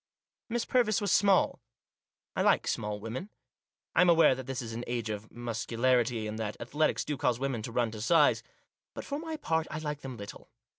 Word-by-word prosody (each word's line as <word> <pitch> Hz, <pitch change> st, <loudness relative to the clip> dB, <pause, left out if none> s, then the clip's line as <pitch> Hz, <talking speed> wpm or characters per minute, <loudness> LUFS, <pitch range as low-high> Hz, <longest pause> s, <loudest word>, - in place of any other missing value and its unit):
Miss 235 Hz, 0 st, -1 dB
Purvis 230 Hz, -5 st, +2 dB
was 205 Hz, -3 st, -1 dB
small. 195 Hz, -1 st, +4 dB, 0.8 s
I -, -, +1 dB
like -, -, +3 dB
small 105 Hz, 0 st, -2 dB
women. 115 Hz, -, -5 dB, 0.6 s
I -, -, +5 dB
am 180 Hz, -, +5 dB
aware 165 Hz, -4 st, +6 dB
that 130 Hz, 0 st, -7 dB
this 135 Hz, -1 st, -3 dB
is 115 Hz, -3 st, -5 dB
an 120 Hz, +2 st, -4 dB
age 120 Hz, -2 st, -2 dB
of 105 Hz, +1 st, -6 dB
muscularity, 120 Hz, 0 st, 0 dB
and 105 Hz, +1 st, -4 dB
that 105 Hz, -2 st, -4 dB
athletics 150 Hz, +6 st, 0 dB
do 150 Hz, -, -2 dB
cause 125 Hz, -2 st, +1 dB
women 130 Hz, -3 st, -2 dB
to 115 Hz, -, -6 dB
run 115 Hz, -1 st, 0 dB
to 110 Hz, -1 st, -7 dB
size. 150 Hz, +6 st, +4 dB, 0.5 s
But, -, -, -6 dB
for 285 Hz, +1 st, -3 dB
my 320 Hz, -1 st, -5 dB
part, 160 Hz, -, 0 dB
I 155 Hz, -, -4 dB
like 150 Hz, -2 st, -4 dB
them 130 Hz, -2 st, -7 dB
little. 100 Hz, -1 st, -10 dB
125 Hz, 200 wpm, -30 LUFS, 115-165 Hz, 0.8 s, aware